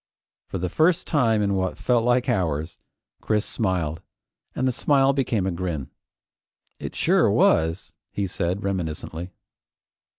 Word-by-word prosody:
For -, -, -4 dB
the 90 Hz, 0 st, -2 dB
first 165 Hz, -, +2 dB
time 115 Hz, -8 st, +2 dB
in 100 Hz, -1 st, +1 dB
what 95 Hz, -1 st, -1 dB
felt 120 Hz, -2 st, +2 dB
like 125 Hz, +1 st, +2 dB
hours, 85 Hz, -, -1 dB, 0.4 s
Chris 105 Hz, 0 st, 0 dB
smiled, 85 Hz, -7 st, -1 dB, 0.5 s
and 130 Hz, -, 0 dB
the -, -, +2 dB
smile 135 Hz, +2 st, +3 dB
became 120 Hz, -8 st, 0 dB
a 95 Hz, -, 0 dB
grin. 85 Hz, -6 st, -4 dB, 0.9 s
"It -, -, -6 dB
sure -, -, +3 dB
was!" 80 Hz, +3 st, +2 dB, 0.2 s
he 100 Hz, -, -2 dB
said 90 Hz, +2 st, -2 dB
reminiscently. 85 Hz, -2 st, -3 dB
95 Hz, 135 wpm, -24 LUFS, 85-120 Hz, 0.9 s, smile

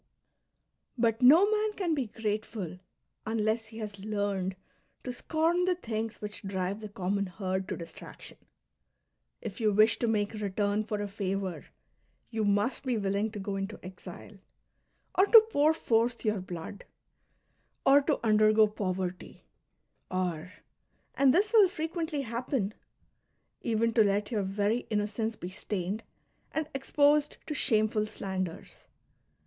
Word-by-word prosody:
But 230 Hz, -1 st, +1 dB
no 305 Hz, +10 st, +8 dB
man 430 Hz, 0 st, +1 dB
can 365 Hz, -5 st, -1 dB
be 270 Hz, -6 st, -1 dB
grateful 210 Hz, -4 st, -4 dB, 0.5 s
unless 220 Hz, 0 st, 0 dB
he 220 Hz, 0 st, -12 dB
has 210 Hz, -3 st, -6 dB
learned 200 Hz, -2 st, -2 dB, 0.5 s
to 250 Hz, -, -4 dB
scorn 330 Hz, +7 st, +1 dB
the 365 Hz, -1 st, +2 dB
things 225 Hz, -8 st, -4 dB
which 210 Hz, 0 st, -6 dB
drive 195 Hz, 0 st, -3 dB
the 215 Hz, -1 st, -7 dB
common 200 Hz, 0 st, -1 dB
herd 190 Hz, 0 st, -3 dB
to -, -, -3 dB
distraction; 170 Hz, -1 st, -10 dB, 1.0 s
if -, -, -6 dB
you 215 Hz, -1 st, +3 dB
wish 215 Hz, +3 st, +4 dB
to 235 Hz, -, +1 dB
make 210 Hz, -2 st, 0 dB
return 205 Hz, 0 st, -1 dB
for 210 Hz, -1 st, -3 dB
a -, -, -3 dB
favour, 195 Hz, -2 st, -3 dB, 0.6 s
you 220 Hz, -2 st, -1 dB
must 205 Hz, +4 st, +1 dB
be 255 Hz, -4 st, 0 dB
willing 200 Hz, +1 st, 0 dB
to 210 Hz, -, -8 dB
go 195 Hz, 0 st, -3 dB
into 195 Hz, +2 st, -4 dB
exile, 185 Hz, +2 st, -10 dB, 0.8 s
or 385 Hz, -, +6 dB
to 445 Hz, 0 st, +9 dB
jiour 300 Hz, -2 st, +4 dB
forth 235 Hz, -6 st, 0 dB
your 215 Hz, -3 st, +1 dB
blood, 180 Hz, +3 st, -7 dB, 1.0 s
or 280 Hz, +1 st, +7 dB
to 290 Hz, +1 st, 0 dB
undergo 215 Hz, 0 st, +5 dB
poverty, 185 Hz, -3 st, -4 dB, 0.7 s
or, 180 Hz, -2 st, -2 dB, 0.3 s
— -, -, -44 dB
and 275 Hz, -1 st, +5 dB
this 405 Hz, -, +2 dB
will 415 Hz, -5 st, +7 dB
frequently 320 Hz, -3 st, -3 dB
happen, 235 Hz, -3 st, -2 dB, 0.5 s
— -, -, -47 dB
even 230 Hz, 0 st, +1 dB
to 225 Hz, -1 st, +6 dB
let 205 Hz, +1 st, 0 dB
your 215 Hz, -3 st, +1 dB
very 205 Hz, +4 st, 0 dB
innocence 215 Hz, +1 st, -1 dB
be 180 Hz, -2 st, -7 dB
stained 195 Hz, +1 st, -3 dB, 0.5 s
and 315 Hz, -1 st, -2 dB
exposed 290 Hz, +2 st, +2 dB
to 305 Hz, -, -3 dB
shameful 215 Hz, -5 st, +2 dB
slanders. 190 Hz, -5 st, -5 dB
215 Hz, 140 wpm, -30 LUFS, 200-245 Hz, 1.0 s, to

